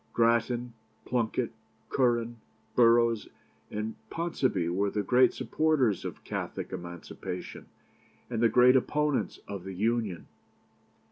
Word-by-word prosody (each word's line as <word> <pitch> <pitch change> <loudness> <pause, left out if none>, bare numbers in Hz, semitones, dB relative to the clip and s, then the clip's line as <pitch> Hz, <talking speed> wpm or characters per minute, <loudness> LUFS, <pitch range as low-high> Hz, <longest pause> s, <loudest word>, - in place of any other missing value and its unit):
Grattan, 120 +1 +2 0.3
Plunket, 120 0 0 0.4
Curran, 120 -2 +1 0.4
Burrowes, 115 -2 +4 0.4
and 105 +1 -3 0.2
Ponsonby 130 - 0
were 100 +3 +1
the 105 +1 -2
great 125 +5 +5
supporters 145 - +1
of - - -6
Catholic - - -5
Emancipation, 85 -1 -7 0.6
and 115 -2 -2
the 115 - +5
great 125 +2 +6
opponents 150 +2 +1
of 100 -3 -6
the 95 0 -7
Union. 110 -3 -1
115 Hz, 110 wpm, -29 LUFS, 105-125 Hz, 0.6 s, great